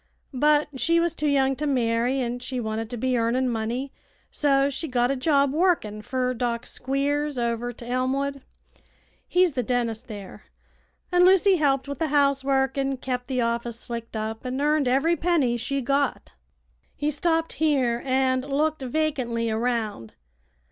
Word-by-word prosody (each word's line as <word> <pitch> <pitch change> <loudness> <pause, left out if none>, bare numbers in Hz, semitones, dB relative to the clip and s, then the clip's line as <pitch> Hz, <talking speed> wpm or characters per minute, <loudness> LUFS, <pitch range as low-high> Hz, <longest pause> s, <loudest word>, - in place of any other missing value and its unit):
But 295 +1 +2
she 335 +4 +3
was 340 -1 +1
too 305 -2 -2
young 270 -1 +2
to 300 - -2
marry, 245 0 +1
an' 245 0 -2
she 250 0 -4
wanted 220 -1 -3
to 245 - -5
be 255 +2 0
earnin' 240 +3 +1
money; 240 +4 -3 0.4
so 275 -2 +2
she 285 +4 -3
got 245 -1 +1
a - - 0
job 280 0 +2
workin' 310 - +1
fer 255 +3 -1
Doc 240 -1 -2
Squiers, 280 +2 -1
over 235 0 -1
to 240 0 -11
Elmwood. 265 +3 -1 0.9
He's 360 -3 +3
the 250 - 0
dentist 235 -1 -2
there, 205 -2 -9 0.7
an' 355 0 +4
Lucy 380 +1 +5
helped 275 -3 +1
with 280 -1 -5
the 320 - +1
housework 275 -1 +2
an' 270 0 -1
kept 250 -1 -4
the 255 -1 -1
office 235 0 -2
slicked 235 -1 -6
up, 220 +2 -4
an' 255 +1 -3
earned 295 -1 +2
ev'ry 275 +7 +3
penny 320 -9 +1
she 275 +4 -2
got." 275 +3 0 0.6
He 295 +1 -1
stopped 325 +2 0
here, 260 -6 +2
and 260 -1 +1
looked 295 +2 0
vacantly 255 -5 -1
around. 220 - -2
265 Hz, 160 wpm, -25 LUFS, 240-290 Hz, 0.9 s, Lucy